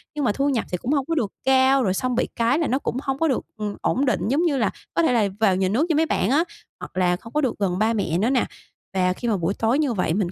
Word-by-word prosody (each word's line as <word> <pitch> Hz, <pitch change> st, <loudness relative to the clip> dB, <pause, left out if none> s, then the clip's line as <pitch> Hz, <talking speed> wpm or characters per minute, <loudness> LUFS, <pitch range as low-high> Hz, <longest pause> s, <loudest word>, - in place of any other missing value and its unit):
nhưng 290 Hz, -, -1 dB
mà 210 Hz, -, +3 dB
thu 275 Hz, +5 st, 0 dB
nhập 245 Hz, -5 st, 0 dB
thì 180 Hz, -, -1 dB
cũng 240 Hz, -, -3 dB
hông 280 Hz, -3 st, +1 dB
có 330 Hz, -, -1 dB
được 215 Hz, -9 st, -1 dB
cao, 265 Hz, 0 st, +4 dB
rồi 190 Hz, -3 st, +1 dB
xong 250 Hz, +4 st, -1 dB
bị -, -, +1 dB
cái 235 Hz, +6 st, +2 dB
là 325 Hz, -, 0 dB
nó 260 Hz, +3 st, +1 dB
cũng 250 Hz, -, -3 dB
hông 270 Hz, -1 st, -2 dB
có 325 Hz, -, +2 dB
được, 265 Hz, -, -1 dB
ừm, 210 Hz, -1 st, -4 dB
ổn 275 Hz, +3 st, +1 dB
định, 250 Hz, -, 0 dB
giống 290 Hz, +8 st, +2 dB
như 285 Hz, -5 st, +1 dB
là, 215 Hz, -5 st, +2 dB, 0.2 s
có 335 Hz, -, +2 dB
thể 255 Hz, -, +3 dB
là 220 Hz, -4 st, +3 dB
vào 195 Hz, -4 st, +3 dB
nhà 190 Hz, 0 st, +1 dB
nước 245 Hz, -, +2 dB
như 315 Hz, -, +2 dB
mấy 320 Hz, +1 st, +3 dB
bạn 215 Hz, -, 0 dB
á, 300 Hz, +5 st, +3 dB, 0.4 s
hoặc -, -, -9 dB
là 180 Hz, -1 st, +3 dB
không 230 Hz, +5 st, -12 dB
có 300 Hz, -, +1 dB
được 260 Hz, -5 st, 0 dB
gần 185 Hz, -3 st, 0 dB
ba 225 Hz, +2 st, +2 dB
mẹ 175 Hz, -6 st, -1 dB
nữa 220 Hz, +6 st, +1 dB
nè. 260 Hz, -3 st, +2 dB, 0.5 s
Và 180 Hz, -1 st, +2 dB
khi 240 Hz, +6 st, -5 dB
mà 210 Hz, -4 st, +1 dB
buổi 175 Hz, +3 st, -1 dB
tối 230 Hz, +7 st, +1 dB
như 280 Hz, -6 st, +1 dB
vậy 180 Hz, -5 st, 0 dB
mình 185 Hz, -2 st, -1 dB
235 Hz, 315 wpm, -23 LUFS, 200-275 Hz, 0.5 s, cao